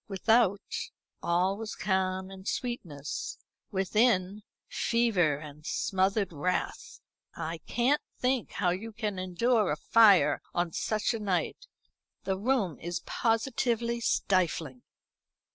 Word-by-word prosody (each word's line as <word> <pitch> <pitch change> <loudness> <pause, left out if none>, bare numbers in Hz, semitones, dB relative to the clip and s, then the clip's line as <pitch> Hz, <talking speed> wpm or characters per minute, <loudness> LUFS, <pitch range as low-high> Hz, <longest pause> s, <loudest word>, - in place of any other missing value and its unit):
Without, 205 0 +1 0.3
all 180 +3 +1
was 225 -1 -5
calm 190 -1 -1
and 190 +1 -10
sweetness, 165 - -4 0.3
within, 200 0 +2 0.3
fever 210 -10 +2
and 150 0 -11
smothered 190 +3 0
wrath. 180 +5 -2 0.4
"I 165 0 -4
can't 255 +5 +2 0.2
think 255 -2 0
how 180 -3 +1
you 220 +5 -5
can 210 -3 -3
endure 205 +3 +1
a - - +1
fire 210 +1 +5
on 175 -1 0
such 215 +2 0
a 225 - -3
night. 205 - -2 0.6
The 190 - 0
room 210 - 0
is 175 +1 -4
positively 235 0 0
stifling." 170 - 0
195 Hz, 110 wpm, -29 LUFS, 180-230 Hz, 0.6 s, fire